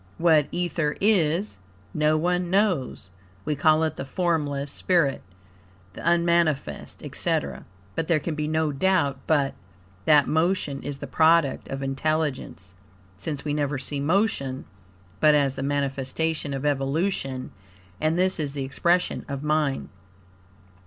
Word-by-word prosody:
What 160 -4 +4
Ether 170 -4 -1
is, 190 - +2 0.4
no 155 0 +2
one 180 +2 0
knows. 180 - 0 0.3
We 150 - 0
call 155 +2 +3
it 160 -1 -1
the - - -3
formless 145 -2 -1
spirit, 165 -7 +1 0.7
the - - -9
unmanifest, 170 -3 +1
etc. 70 -3 -2 0.3
But, 160 - -2
there 165 -3 +3
can 160 +2 -3
be 150 0 -2
no 155 0 +1
doubt 145 -3 +1
but, 145 -3 +2 0.5
that 150 -2 +6
Motion 160 -3 0
is 145 -1 -5
the - - -6
product 160 -3 +3
of 135 0 -5
Intelligence, 135 - -2 0.4
since 145 +10 -4
we 145 - -1
never 145 -1 -1
see 140 +2 -4
Motion 145 -5 0 0.5
but 150 -1 +5
as 140 -2 +2
the - - -6
manifestation 140 +2 -1
of 135 +2 -4
evolution, 135 -1 -1 0.5
and 155 +2 +1
this 185 0 +2
is 145 -3 -2
the 140 - -2
expression 175 +6 +1
of 140 0 -4
Mind. 150 -2 0
150 Hz, 135 wpm, -25 LUFS, 140-170 Hz, 0.7 s, that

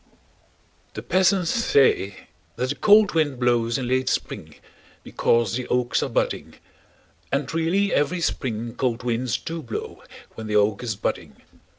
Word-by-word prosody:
The - - -6
peasants 185 -2 +2
say 135 - +2 0.3
that 130 +1 -1
a - - -3
cold 210 +1 +5
wind 145 -6 0
blows 120 -2 +1
in 130 -2 -3
late 130 +1 +1
spring - - -4 0.5
because 115 -4 +1
the 125 +1 -3
oaks 125 -1 +1
are - - -2
budding, - - -2 0.8
and 140 +1 -1
really 175 +5 +1
every 175 +5 +1
spring 115 -7 -2
cold 120 -3 -2
winds 120 -1 -1
do 165 0 -6
blow 115 -6 -6 0.3
when 110 -1 -8
the 105 - -2
oak 105 -1 +2
is 115 -4 -3
budding. - - -4
130 Hz, 150 wpm, -23 LUFS, 115-165 Hz, 0.8 s, cold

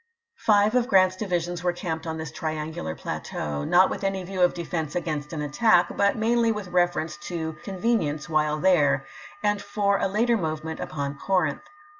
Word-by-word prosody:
Five 210 -1 +4
of 250 -1 +2
Grant's 185 -4 +4
divisions 175 -3 -2
were 175 -1 +1
camped 165 -2 -4
on 160 0 -3
this 160 -1 -6
triaDgular 155 - -4
plateau, 75 -1 -4
not 185 - +4
with - - -4
any 195 -1 -1
view 185 0 -4
of 180 - +4
defense 165 -3 -3
against 150 -4 -3
an 155 -3 -3
attack, 175 +4 +3
but 200 0 +3
mainly 230 +1 +2
with 210 -4 -4
reference 175 -2 0
to 160 -2 -3
convenience 190 -7 -1
while 155 -2 +1
there, 145 -7 +3 0.4
and 205 -1 +1
for 205 -1 0
a - - +1
later 230 +4 +2
movement 160 -2 -3
upon 140 -1 -4
Corinth. 180 -7 0
175 Hz, 170 wpm, -25 LUFS, 155-200 Hz, 0.4 s, Five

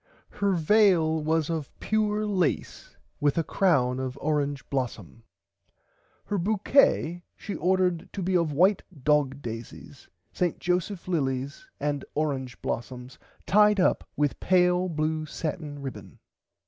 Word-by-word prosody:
Her 200 -1 0
veil 170 -3 +3
was 160 0 +1
of 160 -4 -3
pure 215 0 0
lace 185 -6 -2 0.2
with 145 0 +1
a 165 - +2
crown 140 -8 +2
of 130 0 -4
orange 145 -2 -1
blossum. 120 -6 -4 1.0
Her 205 - -1
bouquett 195 - +2
she 205 - -6
ordered 180 0 +1
to 195 - -4
be 185 +1 0
of 170 -3 +2
white 185 +7 +3 0.2
dog 145 -2 +1
daisies 115 0 -8 0.3
St. 180 -2 0
Joseph 180 +1 -2
lilies 140 - -2
and 145 -1 -2
orange 135 -4 -2
blossums 125 +1 -5 0.3
tied 210 0 +4
up 185 - +1
with 145 -1 0
pale 180 0 +3
blue 155 -1 -1
satin 150 -2 -5
ribbon. 135 - -8
160 Hz, 125 wpm, -27 LUFS, 140-185 Hz, 1.0 s, tied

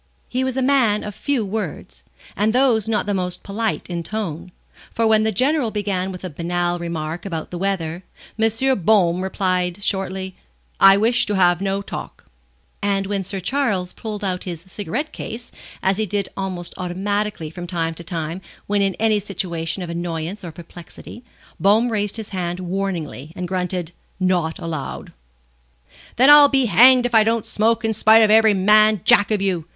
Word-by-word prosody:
He 255 +1 -2
was 260 0 -2
a 265 - +1
man 250 -6 +2
of 210 - -6
few 265 0 -1
words, 180 - -6 0.3
and 210 +3 +1
those 240 -5 +2
not 220 - 0
the 205 - -1
most 180 -2 -3
polite 215 +2 -2
in 175 -1 -4
tone, 180 -2 -5 0.4
for 230 - 0
when 220 -1 +4
the 220 0 +1
General 260 +4 +1
began 195 -3 -2
with 180 0 -9
a 185 - -4
banal 175 +2 -2
remark 165 -1 -4
about 165 -5 -5
the 175 - -5
weather, 175 -3 -2 0.4
M. 225 +3 +2
Baume 180 -2 +3
replied, 185 -1 -1
shortly: 190 -1 -2 0.4
"I 195 0 +8
wish 230 +4 +2
to 205 - -1
have 175 -1 +3
no 195 0 -1
talk;" - - -8 0.6
and 200 -1 0
when 200 0 -2
Sir 195 +1 -4
Charles 200 -5 -1
pulled 210 -2 -6
out 185 -2 -2
his 170 -3 -6
cigarette 205 - -5
case, 235 +2 -7 0.3
as 190 0 +2
he 215 0 -1
did 200 0 -2
almost 185 -3 -4
automatically 195 -1 -3
from 175 +1 -8
time 165 -2 -2
to 170 - -7
time 170 0 -4 0.2
when 205 0 0
in 195 -2 +1
any 220 -1 +2
situation 180 -3 -3
of 170 - -6
annoyance 170 +3 -4
or 170 - -6
perplexity, 175 +7 -11 0.4
Baume 220 +5 +3
raised 210 -1 -1
his 220 -2 -7
hand 180 -2 -3
warningly 175 -6 -4
and 180 0 -4
grunted: 180 -2 -2 0.3
"Not 180 -3 0
allowed." 165 -5 -6 1.0
"Then 260 +4 +6
I'll 290 -1 +9
be 270 -2 +2
hanged 245 +5 +6
if 245 - -2
I 220 -1 +6
don't 225 0 0
smoke 225 +2 +1
in 220 - +1
spite 220 +1 +6
of 215 - +3
every 220 -1 +5
man 215 +1 +4
jack 205 - +5
of 210 -3 0
you!" 175 -5 -1
195 Hz, 175 wpm, -21 LUFS, 175-220 Hz, 1.0 s, I'll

